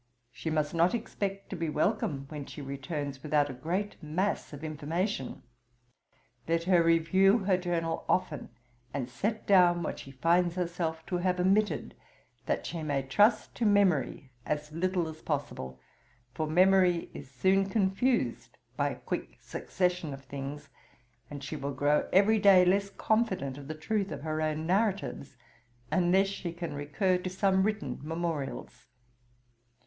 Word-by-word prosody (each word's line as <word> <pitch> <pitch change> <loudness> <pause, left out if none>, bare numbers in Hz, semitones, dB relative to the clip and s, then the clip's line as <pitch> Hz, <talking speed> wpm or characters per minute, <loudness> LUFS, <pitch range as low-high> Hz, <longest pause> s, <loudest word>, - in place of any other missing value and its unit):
She 125 +6 -5
must 155 -1 0
not 170 +5 +3
expect 195 -4 -4
to - - -3
be 165 -2 -2
welcome 150 -3 0
when 150 -3 -6
she - - -9
returns, 140 0 -5
without 150 -2 +1
a - - -7
great 180 +10 -3
mass 185 +7 -1
of 145 +1 -9
information. 155 - -3 1.0
Let 165 0 +1
her 180 -1 +4
review 190 +6 +4
her 190 -1 +3
journal 170 -2 -2
often, 160 -5 0 0.5
and 130 -4 -2
set 210 - -3
down 175 -3 +5
what - - -4
she - - -10
finds 170 +6 +2
herself 170 -2 -2
to 180 0 -1
have 180 0 0
omitted, 195 +4 +1 0.5
that - - -1
she 170 - -4
may 145 -3 -1
trust 210 - +3
to 235 - 0
memory 180 -10 +2
as 150 +2 -3
little 175 +1 0
as 160 0 -9
possible, 65 - -4 0.5
for 155 - -2
memory 180 +1 +4
is 140 - -9
soon 190 +9 +2
confused 190 - 0 0.2
by 145 +2 +1
a 135 - -5
quick - - -4
succession 180 -5 -2
of 135 - -14
things; 140 +2 -6 0.6
and 145 -1 -7
she 150 - -5
will 140 -1 -4
grow 145 +2 +2
every 210 +3 +5
day 195 -3 +7
less 200 +2 +2
confident 200 - 0
of 140 -1 -10
the 155 - -5
truth 200 +5 -1
of - - -6
her 155 0 -2
own 155 0 -1
narratives, 190 - -1 0.5
unless 185 +2 +4
she 195 -3 -4
can 170 -1 -5
recur 180 +6 0
to 185 - -4
some 190 +1 +2
written 210 +1 -1
memorials. 155 -5 -4
170 Hz, 155 wpm, -30 LUFS, 145-190 Hz, 1.0 s, day